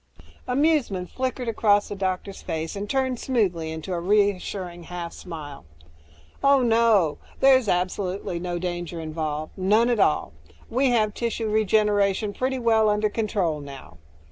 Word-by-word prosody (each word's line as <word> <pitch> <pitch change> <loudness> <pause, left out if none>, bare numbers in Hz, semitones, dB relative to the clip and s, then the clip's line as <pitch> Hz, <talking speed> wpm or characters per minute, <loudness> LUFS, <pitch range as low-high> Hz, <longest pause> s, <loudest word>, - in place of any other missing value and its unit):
Amusement 250 - +1
flickered 255 -1 -3
across 205 -2 +2
the 205 - -4
doctor's 190 0 -3
face, 160 +2 -4
turned 260 -2 0
smoothly 185 -11 0
into 160 +4 -5
a 175 - -1
reassuring 185 -2 0
half 175 -1 -6
smile. 150 -5 -8 0.8
"Oh, 275 -1 +5
no. 225 -8 +3 0.2
There's 260 -3 +5
absolutely 180 0 -1
no 175 0 -3
danger 175 -1 -4
involved. 155 -1 -4
None 210 +6 +3
at 235 - +1
all. 150 - +2 0.4
We 260 +3 +2
have 215 -3 +2
tissue 230 -2 -2
regeneration 210 -1 +2
pretty 260 +3 -1
well 225 -3 +3
under 210 0 +1
control 200 -9 -1
now. 135 -12 -11
200 Hz, 135 wpm, -24 LUFS, 175-230 Hz, 0.8 s, Oh